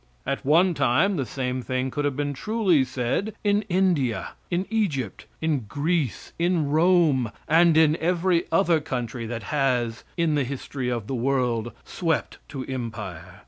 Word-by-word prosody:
At 140 +1 -2
one 170 +6 +4
time 165 +9 +2
the 135 -7 -2
same 130 -1 -3
thing 130 +1 -2
could 145 +2 -2
have 145 -2 0
been 145 0 -1
truly 190 - +2
said 130 - -2
in 205 0 +3
India, 170 - +1 0.2
in 180 +2 0
Egypt, 150 - -1
in 150 -7 0
Greece, 150 -2 -1
in 170 -4 +1
Rome, 155 -7 +3 0.2
and 165 +1 +5
in 160 -1 +5
every 175 +1 +2 0.4
country 120 -4 -4
that 115 -1 -5
has 125 -5 0
in 165 -2 +2
the 145 -1 +2
history 130 0 -4
of 120 -4 -2
the 135 - -4
world, 120 -2 0
swept 165 -4 -2
to 130 -2 -5
empire. 105 -9 -6
140 Hz, 150 wpm, -25 LUFS, 125-170 Hz, 0.4 s, and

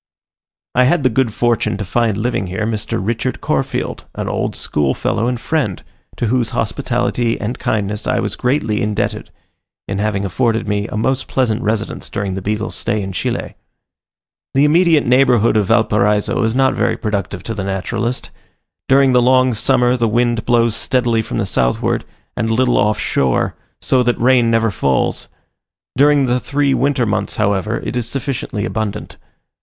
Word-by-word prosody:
I 125 +1 +4
had 145 +3 +2
the 130 - +3
good 120 0 +1
fortune 120 -2 0
to 105 - -4
find 110 +2 0
living 110 -3 -1
here 95 +4 -3
Mr. 110 -1 -2
Richard 115 +5 -2
Corfield, - - -2
an - - -4
old - - -2
schoolfellow 75 - -1
and 125 -1 -1
friend, 125 - -2 0.3
to - - -1
whose 120 0 +1
hospitality 120 0 -1
and 115 +4 -4
kindness 105 0 -2
I 125 -1 +1
was - - -2
greatly 125 -4 0
indebted, 105 0 -2 0.6
in 95 0 -3
having 100 -1 -1
afforded 110 +3 0
me 100 0 -1
a 105 - -5
most 130 +4 0
pleasant 120 -3 0
residence 110 -1 -2
during 100 -2 -3
the 95 - -4
Beagle's 105 +3 -2
stay 110 - -1
in 95 - -5
Chile. 90 - -3 1.0
The 140 +2 +5
immediate 160 0 +4
neighbourhood 125 -3 +4
of 105 -3 +2
Valparaiso 105 0 +2
is 110 0 0
not 130 0 +3
very - - 0
productive 100 -4 -3
to 115 - -4
the 100 -3 -4
naturalist. 100 +5 -3 0.6
During 135 -1 +5
the 125 - +5
long 130 0 +4
summer 125 +2 +2
the 115 -1 +1
wind 120 +1 +1
blows 115 -2 +3
steadily 120 -2 +1
from - - -5
the 110 - 0
southward, 60 -9 0 0.3
and 110 - -1
a 115 - +1
little 125 0 +2
off 105 +1 +2
shore, 65 -2 0 0.3
so 130 - +2
that 120 -1 +1
rain 125 -1 +4
never 115 -1 +2
falls; 70 -7 0 0.7
during 145 +1 +4
the 125 0 +1
three 140 +1 0
winter 135 -3 +1
months, 105 - -1
however, 105 0 0
it - - -4
is 120 -2 -2
sufficiently 135 -6 -3
abundant. 105 +2 -4
115 Hz, 170 wpm, -17 LUFS, 105-125 Hz, 1.0 s, The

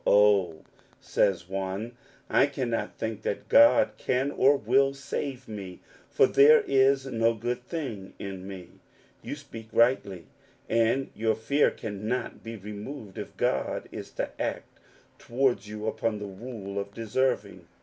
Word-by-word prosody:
" - - -6
Oh," 100 -6 +4 0.4
says 90 -3 +1
one, 95 +4 -3 0.2
" - - -29
I 135 - +4
cannot 130 -5 -3
think 110 -1 -4
that 100 - -3
God 285 0 +6
can 130 +3 0
or 140 0 +4
will 135 +4 +2
save 135 -1 -5
me, 100 -4 -7 0.3
for - - +5
there 145 +3 +7
is 135 0 +3
no 115 -3 +1
good 120 +2 -3
thing 125 - -5
in 95 -1 -7
me! 95 -3 -8 0.3
" - - -32
You - - -5
speak 115 -6 -11
rightly, 100 - +2 0.4
and 115 +4 +1
your 110 +1 0
fear 140 +7 +2
cannot 110 +3 -4
be 115 0 -6
removed 105 +2 -8
if - - -8
God 65 - -1
is - - -7
to - - -3
act - - -4 0.4
towards 120 -2 0
you 105 0 -6
upon 110 0 -1
the 105 - -6
rule 100 -1 -6
of 100 0 -6
deserving. 125 +4 -1
115 Hz, 150 wpm, -27 LUFS, 100-135 Hz, 0.4 s, there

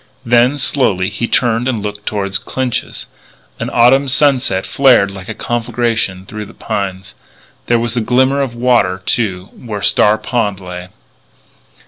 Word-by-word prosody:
Then, 120 +4 +3
slowly, 105 -10 +1
he 110 +3 -3
turned 120 0 +1
and 115 -6 -2
looked 105 0 -6
toward 100 -2 -2
Clinch's. 130 -3 -3 0.5
An - - -3
autumn 130 +4 +4
sunset 130 -8 +2
flared 125 -8 +4
like 95 0 -10
a 110 - -5
conflagration 115 -5 -2
through 105 +1 -7
the - - -15
pines. 100 -3 -4 0.5
There 120 - +3
was 115 0 -1
a 120 - +1
glimmer 130 +4 +2
of 130 -4 -3
water, 120 -7 +1
too, 95 -5 -1
where 105 -5 -7
Star 105 +2 +4
Pond 105 -3 -2
lay. 90 -1 -8
115 Hz, 145 wpm, -15 LUFS, 100-125 Hz, 0.5 s, autumn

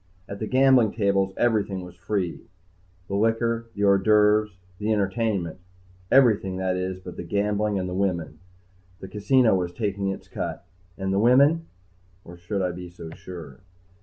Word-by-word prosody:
At 100 - -7
the 110 - -3
gambling 130 -3 +4
tables 100 -3 +1
everything 105 -5 +1
was 90 - -11
free 90 0 -3 0.7
the - - -6
liquor, 115 +2 0
the 100 - -2
hors 100 -1 +5
d'oeuvres, 105 +1 +4 0.3
the 105 +1 -1
entertainment. 100 -4 -1 0.5
Everything, 110 -8 +4
that 95 0 -1
is, 90 0 -3
but 90 -1 -10
the - - -5
gambling 105 +2 0
and 90 -1 -2
the 90 - -4
women. 85 -5 -2 0.6
The 95 - -8
casino 110 +4 +3
was 90 -2 0
taking 100 +1 -2
its 95 - -4
cut. - - -5 0.3
And 95 0 -2
the 100 - +2
women 140 +8 +4 0.6
or 85 - -11
should 95 +3 -3
I 90 - 0
be 90 0 -8
so 85 -2 -10
sure? 80 -6 -10
100 Hz, 165 wpm, -25 LUFS, 90-110 Hz, 0.7 s, hors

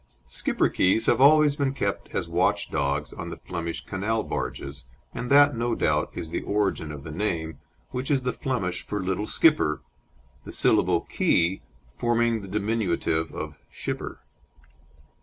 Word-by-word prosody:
Schipperkes 95 - +1
have 120 - +3
always 150 +1 +6
been 140 -2 0
kept 100 -6 -2
as - - -1
watch - - +1
dogs 70 +2 -1
on - - -6
the - - -5
Flemish 85 -2 -5
canal 105 +3 -1
barges, 70 -1 -4 0.3
and 125 - -4
that, 145 0 +6
no 120 +1 0
doubt, - - +1
is 80 - -5
the - - -2
origin 100 -6 -1
of 75 -2 -8
the 80 - -7
name, 80 -4 -2 0.3
which 130 +1 -2
is 135 -3 +2
the 125 - -1
Flemish 95 -10 -2
for 105 - -4
"Little 95 +2 -2
Skipper," 150 - +3 0.6
the - - -8
syllable - - +3
"ke" 85 +3 +1 0.3
forming 115 - +1
the 100 - -9
diminutive 95 -6 0
of 75 -2 -6
"schipper." - - -5
100 Hz, 150 wpm, -26 LUFS, 80-120 Hz, 0.6 s, always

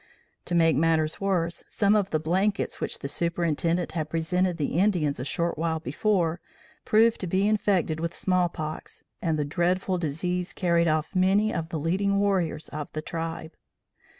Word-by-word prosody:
To 175 - -1
make 165 -1 +4
matters 160 +2 +1
worse, 175 -4 0
some 205 0 +2
of 200 -2 +1
the 155 - +1
blankets 190 +6 0
which - - -2
the - - -5
Superintendent 170 +1 0
had 155 -3 -3
presented 175 +2 0
the 150 +1 -1
Indians 175 -9 +1
a - - -3
short 170 +3 -2
while 160 -1 0
before, 170 +3 0 0.4
proved 225 +1 +4
to 185 - -2
be 190 +4 +2
infected 195 -7 +1
with 170 +1 -3
small 185 -2 +1
pox 155 -1 -7 0.2
and 165 -3 0
the 150 - 0
dreadful 180 +4 0
disease 175 +3 -2
carried 170 -2 +2
off 155 0 0
many 195 +4 +3
of 165 -1 -3
the 165 - -3
leading 190 +6 +1
warriors 190 -6 0
of 150 -1 -6
the 155 - -4
tribe. 165 -1 -5
170 Hz, 170 wpm, -26 LUFS, 160-185 Hz, 0.4 s, make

